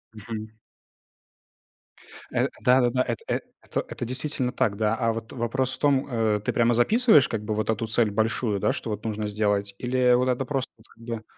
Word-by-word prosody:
Мгм. 110 0 -6 1.8
Э, - - +1
да-да-да, 125 0 +4
эт 120 -2 -2
э - - 0 0.2
это - - -2
это - - -5
действительно 130 +1 -2
так, 100 -4 0
да, 110 0 +1
а 115 0 +1
вот 115 0 -6
вопрос 125 +2 -1
в - - -7
том, 140 -2 +2
э, 110 -4 +1
ты - - 0
прямо 120 0 +3
записываешь 155 - +5
как 110 -2 -3
бы 110 0 -2
вот 110 +1 -2
эту 110 +1 0
цель 110 -1 +2
большую, 110 0 0
да, - - +2
что 115 - -4
вот 105 0 -4
нужно 110 -1 -2
сделать? 105 -1 0
Или 125 0 +2
вот 125 +1 +3
это 125 +1 0
просто 135 -1 -2
вот 110 - -22
как 115 - -19
бы 115 -2 -5
115 Hz, 195 wpm, -25 LUFS, 110-125 Hz, 1.8 s, записываешь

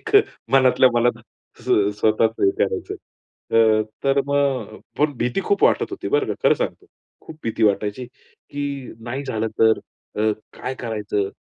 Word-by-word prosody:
एक - - -7 0.4
मनातल्या 130 -1 +5
मनात 120 +1 +2 0.4
स्व 100 0 +2
स्वतःच 110 +1 +3
हे 100 - +4
करायचं. 95 -1 -1 0.6
अ, 110 -1 +4 0.2
तर 135 0 +3
मग 140 -5 0 0.2
पण 150 0 +2
भीती 120 +10 0
खूप 200 - 0
वाटत - - +2
होती - - -5
बरं 435 -1 +1
का - - -2
खरं - - +6
सांगतो. - - -4 0.3
खूप 155 - -12
भीती 115 0 -3
वाटायची 105 +3 +1 0.5
की 140 -2 -4
"नाही 130 +4 -4
झालं 110 -4 -2
तर 110 0 +5 0.4
तर 110 0 +2 0.2
काय 130 - -4
करायचं? 105 -5 -2
120 Hz, 150 wpm, -22 LUFS, 110-140 Hz, 0.6 s, खरं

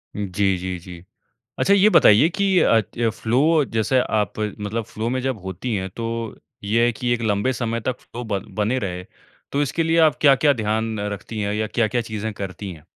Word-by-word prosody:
जी, 100 -1 0
जी, 90 0 -4
जी। 85 -1 -11 0.6
अच्छा 200 - +4
ये 200 +1 +6
बताइए 150 - +6
कि 190 +1 +1
अ, 115 - +4
त 115 +3 -2
फ़्लो 145 +8 +2
जैसे 120 +2 0
आप 105 -5 -1
मतलब 105 +1 -3
फ़्लो 110 +2 -4
में 130 +2 -1
जब 130 -3 -2
होती 95 +6 -4
हैं 95 -2 -2
तो 115 - -4 0.6
ये 115 +3 +2
है 120 - +1
कि 120 +2 -2
एक 120 - -4
लंबे 105 +3 +1
समय 115 -1 -2
तक 125 +2 -3
फ़्लो 120 +1 -8
बन 100 -2 -3
बने 110 +5 0
रहे। 90 -5 -4 0.5
तो 145 - +1
इसके 145 +4 -1
लिए 165 +1 +1
आप 140 - -5
क्या-क्या 145 +1 +5
ध्यान 110 -2 -2
रखती 105 +2 -5
हैं? 100 0 -1
या 110 +1 -1
क्या-क्या 120 +2 0
चीजें 110 -1 -4
करती 100 -1 -6
हैं? 80 -3 -14
110 Hz, 200 wpm, -22 LUFS, 105-125 Hz, 0.6 s, ये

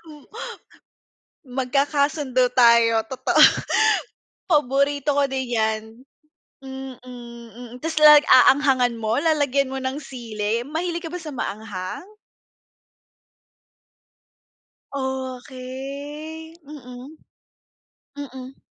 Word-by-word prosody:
Hmm. 305 -3 -15 1.2
Magkakasundo 270 0 0
tayo, 230 -2 +5
totoo. 260 +3 -2 1.1
Paborito 285 -2 +1
ko 280 -1 +3
din 265 -1 -3
yan. 220 -2 0 0.8
Mm, 265 -1 -8
mm, 235 -1 -11
tas 320 -1 -1
lag 300 -1 +8
aanghangan 260 -2 +4
mo, 225 +2 -1
lalagyan 285 -4 +1
mo 265 - -5
ng 265 +2 -3
sili, 230 -5 -4
mahilig 335 +4 -3
ka 325 - -6
ba 360 - -4
sa 320 - -7
maanghang? 205 - -6 2.9
Okey. 270 +4 -6
Mm. 270 0 -11 1.0
Mm. 265 -2 -9
265 Hz, 85 wpm, -22 LUFS, 245-290 Hz, 2.9 s, lag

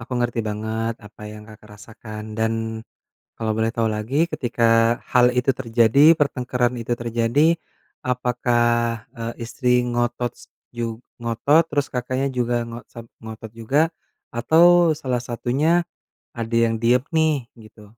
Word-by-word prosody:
Aku 120 +3 -9
ngerti 120 -1 -1
banget 110 +2 -3
apa 105 +1 -15
yang 105 0 -10
Kakak 105 0 -15
rasakan. 110 0 -9
Dan 110 0 -2 0.5
kalau 110 -1 -1
boleh 110 0 +1
tahu 115 -2 0
lagi, 110 +9 0
ketika 115 -3 +2
hal 125 0 +5
itu 125 +2 +1
terjadi, 120 +5 +5
pertengkaran 125 -3 0
itu 120 0 -4
terjadi, 120 +8 +2 0.5
apakah, 120 -2 0
eee, 115 0 -4
istri 125 +1 +1
ngotot 120 0 -1
s - - -15 0.3
jug 115 -2 -4 0.2
ngotot 140 +8 +2
terus, 145 -1 0
Kakaknya 130 +2 -1
juga 120 -1 0
ngo 115 0 -7
sam 115 - -9 0.2
ngotot 110 0 -9
juga, 115 +6 0 0.5
atau 165 +7 +5
salah 130 -5 -2
satunya 135 +8 0 0.5
ada 115 0 -2
yang 115 0 0
diem 120 +2 +3
nih? 160 -1 +3 0.3
Gitu. 110 0 -16
120 Hz, 135 wpm, -22 LUFS, 115-125 Hz, 0.5 s, hal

